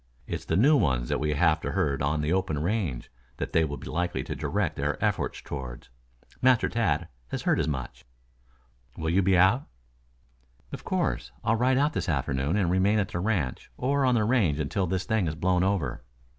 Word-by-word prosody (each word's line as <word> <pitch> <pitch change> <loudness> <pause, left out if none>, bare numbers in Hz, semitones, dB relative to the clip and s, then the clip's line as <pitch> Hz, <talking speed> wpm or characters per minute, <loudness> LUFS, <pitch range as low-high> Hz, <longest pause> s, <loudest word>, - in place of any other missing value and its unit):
It's - - -5
the 80 - 0
new 140 +9 +5
ones 65 - +1
that - - 0
we 75 +1 0
have 80 0 +3
to - - -3
herd 70 -2 0
on 75 +2 0
the 75 +3 0
open 95 -5 0
range 85 - -2 0.3
that - - -4
they 80 - +4
will 70 -2 -3
be 65 - -11
likely 90 +2 -2
to - - -5
direct - - -1
their - - -1
efforts - - -1
toward. 65 -4 -7 0.5
Master 125 -2 +4
Tad 85 -8 0 0.2
has - - -4
heard - - +2
as - - 0
much." 65 -5 -4 0.9
"Will 80 0 -1
you 95 +3 +3
be 95 0 +3
out?" 95 +10 +4 1.0
"Of - - -7
course. - - -1
I'll 115 - +2
ride 130 +3 +2
out 145 +2 +2
this 95 - -2
afternoon 70 +3 0
and 90 -4 +1
remain 95 +4 +3
at 100 -3 0
the 85 - -3
ranch 90 - -1
or 140 +2 +1
on 130 -2 +3
the 110 - +2
range 105 - +2
until 90 +6 -1
this 95 +2 -1
thing 110 -6 +1
has 80 - -2
blown 90 +2 +1
over. 95 -10 -1
90 Hz, 200 wpm, -27 LUFS, 75-105 Hz, 1.0 s, new